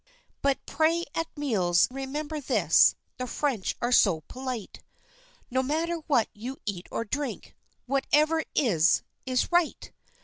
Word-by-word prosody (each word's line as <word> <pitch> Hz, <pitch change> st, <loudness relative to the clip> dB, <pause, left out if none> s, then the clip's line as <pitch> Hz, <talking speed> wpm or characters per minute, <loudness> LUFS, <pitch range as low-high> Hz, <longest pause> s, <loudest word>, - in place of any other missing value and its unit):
But 275 Hz, -1 st, 0 dB
pray 330 Hz, +2 st, +1 dB
at 330 Hz, 0 st, -1 dB
meals, 190 Hz, -12 st, +2 dB
remember 290 Hz, +3 st, -4 dB
this, 210 Hz, -, +4 dB, 0.2 s
the 255 Hz, -, -4 dB
French 250 Hz, -6 st, -1 dB
are 240 Hz, -, +1 dB
so 190 Hz, -9 st, +4 dB
polite, 255 Hz, 0 st, -6 dB, 0.7 s
No 260 Hz, +1 st, +2 dB
matter 320 Hz, +5 st, -1 dB
what 250 Hz, -8 st, +3 dB
you 245 Hz, +6 st, -7 dB
eat 195 Hz, -4 st, -4 dB
or 230 Hz, -, -3 dB
drink, 285 Hz, +5 st, -4 dB, 0.3 s
"whatever 300 Hz, +4 st, +2 dB
is, 180 Hz, -, +3 dB, 0.2 s
is 255 Hz, +5 st, 0 dB
right!" 345 Hz, -2 st, +1 dB
265 Hz, 130 wpm, -27 LUFS, 220-300 Hz, 0.7 s, this